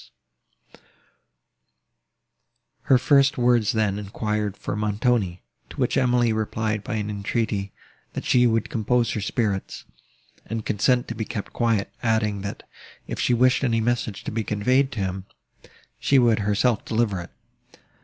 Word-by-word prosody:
Her 130 - +5
first 140 +2 +3
words 120 -3 +3
then 105 -2 0
enquired 105 0 -3
for - - -4
Montoni; 105 -3 0 0.3
to - - -12
which - - +1
Emily 125 -3 +3
replied 110 -1 -2
by 125 - -4
an 105 -1 -2
entreaty, 100 -1 -2 0.4
that - - -5
she 125 -1 +4
would 115 -1 0
compose 115 +1 +1
her 110 - -2
spirits, 100 -1 -2 0.6
and 115 0 -4
consent 120 +4 +1
to - - -2
be 110 0 -3
kept 105 -1 -6
quiet, 115 -4 0
adding, 110 -3 0
that, 100 0 -7 0.4
if - - -6
she 125 - +2
wished 130 +3 +3
any 115 -3 +2
message 120 -2 -1
to - - -4
be 110 0 -2
conveyed 125 +7 +1
to 105 - -3
him, 95 0 -3 0.7
she 140 - +3
would 120 -4 +4
herself 105 +3 +1
deliver 110 -5 0
it. 85 - -10
110 Hz, 145 wpm, -24 LUFS, 105-120 Hz, 0.7 s, Her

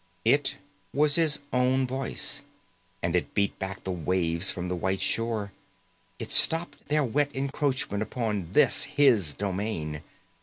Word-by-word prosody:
It 140 +5 +3 0.4
was 150 0 +3
his 155 -2 +5 0.2
own 130 +1 +2
voice, 130 0 0 0.6
and 85 +1 0
it 90 - -2
beat 100 -1 0
back 95 0 -6
the 95 - -3
waves 85 +1 -1
from 90 0 -4
the 90 - -2
white 95 +2 -2
shore, 115 -3 -1 0.7
it - - -6
stopped 165 +1 +4
their 150 0 +1
wet 140 +3 0
encroachment 135 -5 -2
upon 105 -6 -3
this, 150 - +4
his 130 - +2
domain. 95 -6 -4
110 Hz, 140 wpm, -27 LUFS, 95-140 Hz, 0.7 s, his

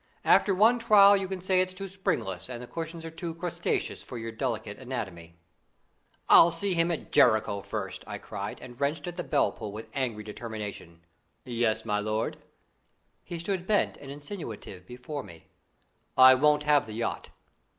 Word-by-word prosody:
After 195 - +5
one 225 +5 +5
trial, 205 -3 +7
you 195 -1 -1
can 190 -1 -5
say 185 0 +2
it's 185 0 -2
too 195 +1 -6
springless 160 - -3
and 120 -2 -6
the 125 - -7
cushions 165 +4 -6
are 165 - -6
too 165 0 -6
crustaceous 175 0 -2
for 125 - -8
your 115 0 -5
delicate 110 -3 -3
anatomy." 95 -11 -6 0.9
"I'll 170 - +8
see 180 +4 -1
him 165 0 +2
at 170 - -4
Jericho 110 -4 +4
first!" - - -5
I - - -5
cried, - - -6
and 120 +2 -11
wrenched 145 +1 -1
at 175 - -5
the 175 - -4
bell 145 - +2
pull 110 -2 -7
with 110 +2 -8
angry 120 -6 -2
determination. 105 -6 -7 0.4
"Yes, 115 -2 0
my 105 0 0
lord!" 110 +1 -2 0.9
He 175 - -6
stood 180 +1 -3
bent 210 -2 +2
and 140 - -11
insinuative 140 - -8
before 125 +4 -6
me. 85 -8 -14 0.7
"I 130 0 +10
won't 150 +3 +3
have 150 -4 +3
the 110 - -7
yacht." 115 +2 -3
140 Hz, 170 wpm, -28 LUFS, 110-175 Hz, 0.9 s, I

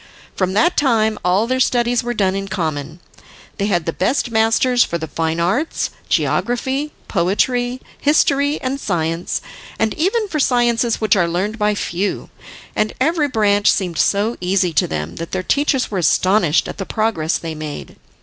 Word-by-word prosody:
From 185 -1 0
that 220 - +3
time 220 -6 +2
all 185 +5 +2
their 255 +2 -1
studies 245 -1 +2
were 240 0 -3
done 190 -3 +1
in 195 0 -3
common. 155 -3 -3 0.6
They 200 - +1
had 175 -5 0
the 165 - -2
best 240 +5 0
masters 225 +3 +3
for 170 - -3
the 160 - -5
fine 160 +2 -2
arts, 200 - 0 0.2
geography, 265 +5 0 0.2
poetry, 245 +7 0 0.2
history 285 0 +2
and 265 +1 -2
science, 165 - -2 0.4
and 220 -1 0
even 410 +7 0
for 310 -5 -3
sciences 240 -3 +2
which 215 -2 +3
are 175 -3 +2
learned 195 +6 -2
by 210 0 +2
few, 195 0 -3 0.4
and 215 0 0
every 305 +2 +2
branch 205 -5 +3
seemed 180 -4 -2
so 210 +4 +1
easy 180 -1 +1
to - - +2
them, 75 +1 -4
that 165 0 -6
their 185 -1 -1
teachers 280 +1 +1
were 195 - -1
astonished 180 -1 +2
at - - -8
the 195 - -3
progress 200 -7 0
they 165 -1 -6
made. 155 -1 -7
210 Hz, 170 wpm, -19 LUFS, 175-245 Hz, 0.6 s, that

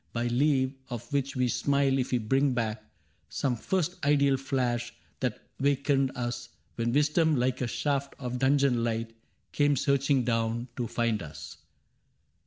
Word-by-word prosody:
By 120 0 -1
leave 130 +1 +2 0.2
of 120 +3 -7
which 140 -1 0
we 125 -1 +2
smile 140 +1 +2
if 125 - -2
we 125 - +3
bring 135 +4 +1
back 110 -2 -2 0.5
Some 130 -3 -1
first 180 +8 -2
ideal 140 -1 +4
flash 125 -3 -1 0.2
that 125 -4 -2 0.2
wakened 140 -1 +2
us 120 -1 -4 0.2
When 115 0 -1
wisdom 150 +3 +3
like 130 0 0
a 125 - 0
shaft 140 +2 -1
of 125 -2 -4
dungeon 135 -2 +3
light 115 0 -2 0.4
Came 145 -1 +3
searching 140 0 +2
down 115 +1 -1
to 120 -2 -2
find 115 -2 0
us. 80 -2 -9
130 Hz, 150 wpm, -28 LUFS, 120-140 Hz, 0.5 s, ideal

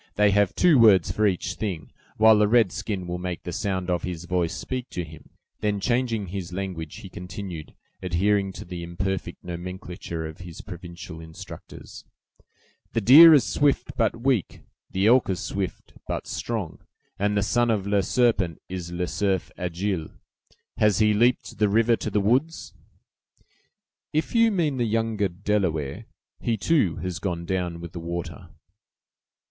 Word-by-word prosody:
they 105 0 +4
have 100 -2 +2
two 165 -7 +5
words 105 -5 +6
for 105 0 +2
each 95 -1 -1
thing, 90 -9 -5 0.3
while 110 -1 +6
a 105 - +4
red 110 -4 +4
skin 95 -2 -4
will 90 0 -4
make 90 -1 -5
the 90 - -5
sound 95 0 -2
of 90 -1 0
his 90 -2 -5
voice 90 -2 -1
speak 130 -1 -4
for 90 - -3
him." 80 0 -13 0.3
Then, 105 -1 0
changing 115 -3 0
his 90 -2 -5
language, 90 -4 -5
he - - -9
continued, 90 -3 -8 0.3
adhering 95 +2 +1
to - - -9
the 90 0 -7
imperfect 90 +1 -4
nomenclature 90 -1 -6
of 80 0 -8
his 90 -3 -9
provincial 85 -1 -9
instructors. 80 0 -11 0.9
"The 115 - +1
deer 150 +10 +10
is 140 - +4
swift, 145 -1 +1
but 115 0 0
weak; 130 -8 0 0.3
the 95 +1 0
elk 120 +1 +5
is 95 -3 -1
swift, 95 -3 -4
but - - -3
strong; 110 -8 -4 0.4
and 105 +1 +1
the 100 - +2
son 120 +3 +2
of 105 -4 0
'Le 100 0 +2
Serpent' 105 -6 +1
is 90 -2 -5
'Le 90 +1 -2
Cerf 95 +1 -1
Agile.' 90 -1 -3 0.7
Has 105 -3 +3
he 105 -1 +4
leaped 120 0 +1
the 105 -1 +3
river 115 +3 +4
to - - -3
the 105 - +1
woods?" 130 +11 0 1.4
"If 155 +1 -1
you 230 -1 +5
mean 165 -9 0
the 120 - +1
younger 110 -2 0
Delaware, 90 - -2 0.3
he, 115 -2 -1
too, 110 - +2
has 90 0 -4
gone 85 -4 -3
down 90 -2 -2
with 85 -1 -8
the 85 - -7
water." 85 0 -6
95 Hz, 165 wpm, -25 LUFS, 90-110 Hz, 1.4 s, deer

